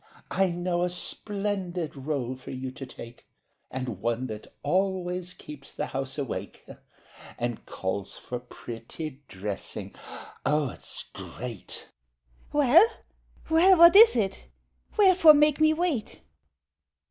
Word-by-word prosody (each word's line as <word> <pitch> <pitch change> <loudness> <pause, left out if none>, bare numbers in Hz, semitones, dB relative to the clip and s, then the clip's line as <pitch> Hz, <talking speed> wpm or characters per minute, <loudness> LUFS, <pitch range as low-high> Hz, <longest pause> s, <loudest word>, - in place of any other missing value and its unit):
I 190 0 +2
know 175 0 -1
a 180 - +1
splendid 185 -3 -3
role 135 -2 -3
for 130 - -12
you 130 0 -5
to 135 0 -8
take, 115 +1 -12 0.4
And 125 -7 -5
one 120 +2 -1
that 110 -3 -7 0.2
always 185 -1 0
keeps 150 -5 -11
the - - -3
house 135 +1 -4
awake— 140 -4 -5 0.7
And 120 -1 -3
calls 95 +1 -4
for 125 - -6
pretty 125 +4 -8
dressing. 95 +1 -5 0.5
Oh, 150 0 +1
it's - - -5
great! - - -8
MAID 120 -5 -6
(excitedly) - - -9 0.6
Well, 295 - +6 0.6
well, 360 +4 +6
what 340 +2 +9
is 445 - +9
it? 195 -5 -1 0.5
Wherefore 370 -6 +7
make 300 0 +3
me 310 0 +6
wait? 315 - -2
170 Hz, 125 wpm, -27 LUFS, -, 0.7 s, what